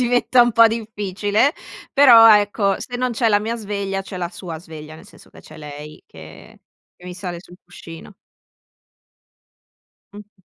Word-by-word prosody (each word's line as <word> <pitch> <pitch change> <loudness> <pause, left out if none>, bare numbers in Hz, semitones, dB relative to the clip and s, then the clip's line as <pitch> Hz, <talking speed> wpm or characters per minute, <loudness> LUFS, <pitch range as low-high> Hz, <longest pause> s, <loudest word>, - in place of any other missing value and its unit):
diventa 245 0 +2
un 240 - 0
po' 230 +1 +6
difficile, 210 +2 -2 0.4
però 235 -6 +7
ecco 205 -1 -1
se 245 - -7
non 255 0 -2
c'è 230 0 0
la 205 -1 +2
mia 225 +2 -4
sveglia 200 -3 -5
c'è 190 - -10
la 175 -1 -4
sua 170 -4 -9
sveglia, 155 -2 -12
nel 165 +5 -15
senso 225 - -20
che - - -17
c'è 155 - -16
lei 150 0 -11
che 80 0 -15 0.4
che 180 - -19
mi 180 0 -9
sale 180 -2 -7
sul 180 0 -17
cuscino. 175 +1 -13 2.0
Mh-mh. 205 -1 -15
200 Hz, 160 wpm, -19 LUFS, 175-225 Hz, 2.0 s, però